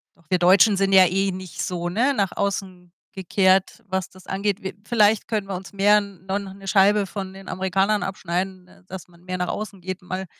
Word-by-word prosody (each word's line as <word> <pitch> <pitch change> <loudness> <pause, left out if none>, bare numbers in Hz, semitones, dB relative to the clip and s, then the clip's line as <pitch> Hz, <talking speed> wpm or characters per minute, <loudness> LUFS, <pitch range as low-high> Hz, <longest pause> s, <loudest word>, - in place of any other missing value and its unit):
doch 170 - -28
wir 180 -2 +2
Deutschen 195 +3 +5
sind 195 0 +1
ja 190 -1 +8
eh 195 +2 0
nicht 185 -2 -7
so, 175 -1 -3
ne, 245 +10 +1
nach 200 -7 0
außen 185 -3 -4 0.2
gekehrt, 190 +3 +1
was 190 -1 -2
das 185 0 -18
angeht. 200 +1 -1
Wir 190 -1 -5
vielleicht 215 -3 +3
können 210 -3 -2
wir 195 - -4
uns 190 +2 -9
mehr 205 +1 +5
no 195 -1 -5
noch 195 -1 -8
'ne 195 0 -13
Scheibe 200 +1 +4
von 190 0 -6
den 195 0 -11
Amerikanern 195 +3 0
abschneiden, 185 0 -5
dass 185 -1 -8
man 170 0 -21
mehr 185 0 -4
nach 180 0 -2
außen 205 -3 -5
geht, 185 +1 -5
mal 185 +1 -5
190 Hz, 210 wpm, -23 LUFS, 185-200 Hz, 0.2 s, ja